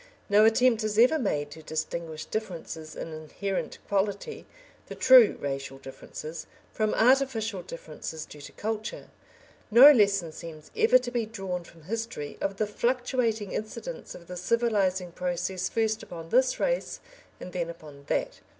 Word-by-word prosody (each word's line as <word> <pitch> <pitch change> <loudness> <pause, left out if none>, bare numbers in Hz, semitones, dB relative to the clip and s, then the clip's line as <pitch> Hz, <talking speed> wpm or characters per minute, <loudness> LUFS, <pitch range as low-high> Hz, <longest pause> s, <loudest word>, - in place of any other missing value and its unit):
No 210 +1 +6
attempt 230 0 +4
is 215 -1 -1
ever 255 +8 +5
made 145 - -1
to 160 - -10
distinguish 160 0 -4
differences 170 -6 -5
in 165 - -6
inherent 180 +5 -4
quality 200 - -2 0.4
the - - -7
true 255 -4 +7
racial 135 -1 -4
differences 155 +4 -8 0.3
from 215 -1 0
artificial 230 -5 +2
differences 160 -1 -7
due 150 - -12
to - - -10
culture. 220 +1 -4 0.6
No 250 +6 +10
lesson 200 - +3
seems 155 -1 -10
ever 445 - +6
to 250 -1 -5
be 235 -3 -1
drawn 190 -5 -4
from 165 -1 -17
history 220 -6 -5
of 195 0 -2
the 215 - +1
fluctuating 235 -1 0
incidence 345 - -6
of 170 - -12
the 180 +1 -7
civilising 190 -3 +1
process 180 +1 -2
first 220 -1 0
upon 165 -1 -9
this 255 +4 +3
race - - -1 0.4
and 180 - -9
then 170 -2 -2
upon 150 -4 -11
that. - - -1
200 Hz, 150 wpm, -28 LUFS, 165-230 Hz, 0.6 s, No